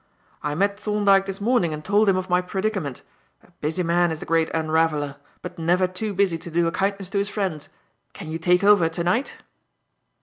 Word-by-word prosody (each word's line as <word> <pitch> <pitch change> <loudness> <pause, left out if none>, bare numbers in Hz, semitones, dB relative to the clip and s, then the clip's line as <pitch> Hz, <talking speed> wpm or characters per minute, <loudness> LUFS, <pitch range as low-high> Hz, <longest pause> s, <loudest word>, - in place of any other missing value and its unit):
"I 150 0 -2
met 200 +4 0
Thorndyke 205 -2 +3
this 195 0 -5
morning 200 -8 +1
and 155 +1 -10
told 205 +1 +3
him 190 - +3
of 185 0 -3
my 180 0 +2
predicament. 190 - -3 0.4
A - - -23
busy 160 +4 -1
man 175 +1 +2
is 160 - -4
the - - -7
Great 165 -1 +1
Unraveller, 155 -3 0 0.3
but 180 0 -8
never 175 +3 +2
too 185 +4 -3
busy 185 -4 +1
to 170 - -9
do 170 +1 +1
a 165 - 0
kindness 195 +1 -2
to 200 - -1
his 200 +1 -1
friends. 190 -8 -3 0.4
Can - - -9
you 165 - -4
take 180 +3 +2
over 200 -5 +5
to 165 +1 -3
night?" 225 +10 -1
180 Hz, 205 wpm, -23 LUFS, 165-200 Hz, 0.4 s, over